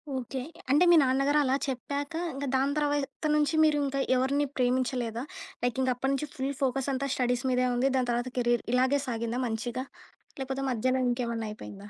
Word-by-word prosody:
Okay. 260 Hz, +1 st, -4 dB, 0.3 s
అంటే 295 Hz, +5 st, +5 dB
మీ 345 Hz, -, +8 dB
నాన్నగారు 275 Hz, +3 st, +2 dB
అలా 265 Hz, -1 st, +2 dB
చెప్పాక 280 Hz, +3 st, -3 dB, 0.2 s
ఇంక 275 Hz, +1 st, -4 dB
దాని 275 Hz, +2 st, +2 dB
తర్వాత 290 Hz, 0 st, -1 dB
నుంచి 300 Hz, +1 st, +2 dB
మీరు 305 Hz, -1 st, +4 dB
ఇంకా 275 Hz, 0 st, -2 dB, 0.2 s
ఎవరిని 275 Hz, +3 st, +1 dB
ప్రేమించలేదా? 250 Hz, -2 st, 0 dB, 0.4 s
లైకింకా 255 Hz, +1 st, +1 dB
అప్పటినుంచి 270 Hz, +3 st, -1 dB
ఫుల్ 275 Hz, +1 st, -2 dB
ఫోకసంతా 270 Hz, +1 st, 0 dB
స్టడీస్ 245 Hz, 0 st, 0 dB
మీదే 250 Hz, 0 st, +2 dB
ఉంది 255 Hz, +3 st, +2 dB
దాని 250 Hz, -1 st, 0 dB
తర్వాత 240 Hz, +1 st, -1 dB
కెరీర్. 240 Hz, -1 st, +2 dB
ఇలాగే 260 Hz, +3 st, +3 dB
సాగిందా 235 Hz, 0 st, -2 dB
మంచిగా? 240 Hz, +3 st, -3 dB, 0.6 s
లేపోతే 265 Hz, +1 st, -3 dB
మధ్యలో 255 Hz, +2 st, +1 dB
ఇంకేమన్నా 235 Hz, -2 st, -2 dB
అయిపోయిందా? 205 Hz, -1 st, -10 dB
260 Hz, 155 wpm, -28 LUFS, 245-275 Hz, 0.6 s, మీ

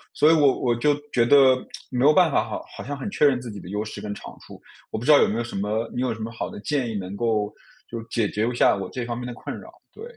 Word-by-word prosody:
所 155 Hz, +2 st, +5 dB
以 -, -, +6 dB
我 145 Hz, -4 st, +4 dB
我 120 Hz, -2 st, +2 dB
就 145 Hz, +3 st, +2 dB, 0.2 s
觉 120 Hz, -1 st, +3 dB
得 135 Hz, -2 st, +7 dB, 0.4 s
没 125 Hz, +1 st, 0 dB
有 150 Hz, -, +7 dB
办 175 Hz, -2 st, +4 dB
法 -, -, +2 dB
好 -, -, -6 dB
好 -, -, -7 dB
像 145 Hz, +1 st, -5 dB
很 140 Hz, -, -5 dB
确 -, -, -1 dB
认 135 Hz, -4 st, +5 dB
自 120 Hz, -3 st, -7 dB
己 100 Hz, -, -8 dB
的 90 Hz, 0 st, -11 dB
优 105 Hz, +2 st, -3 dB
势 110 Hz, -, -7 dB
跟 105 Hz, -, -5 dB
长 -, -, -10 dB
处， -, -, -13 dB, 0.3 s
我 -, -, -4 dB
不 120 Hz, -, -6 dB
知 155 Hz, -, +5 dB
道 145 Hz, -, +7 dB
有 -, -, +4 dB
没 110 Hz, -, -2 dB
有 120 Hz, -, -1 dB
什 120 Hz, -, -8 dB
么 105 Hz, +3 st, -1 dB
你 125 Hz, -, -2 dB
有 130 Hz, -, 0 dB
什 110 Hz, -, -6 dB
么 115 Hz, +1 st, -4 dB
好 115 Hz, -, -5 dB
的 -, -, -9 dB
建 135 Hz, -2 st, -1 dB
议 110 Hz, -, -4 dB
能 95 Hz, 0 st, -5 dB
够 110 Hz, -2 st, 0 dB, 0.3 s
就 115 Hz, -, -6 dB
是 115 Hz, -, -9 dB
解 115 Hz, -3 st, 0 dB
决 110 Hz, +3 st, -1 dB
一 125 Hz, -, -4 dB
下 -, -, +4 dB
我 95 Hz, -2 st, -5 dB
这 125 Hz, -2 st, -4 dB
方 120 Hz, 0 st, -3 dB
面 125 Hz, +1 st, -5 dB
的 120 Hz, -, -5 dB
困 -, -, -7 dB
扰， -, -, -13 dB, 0.2 s
对。 445 Hz, -, -11 dB
120 Hz, 340 characters per minute, -24 LUFS, 110-135 Hz, 0.4 s, 得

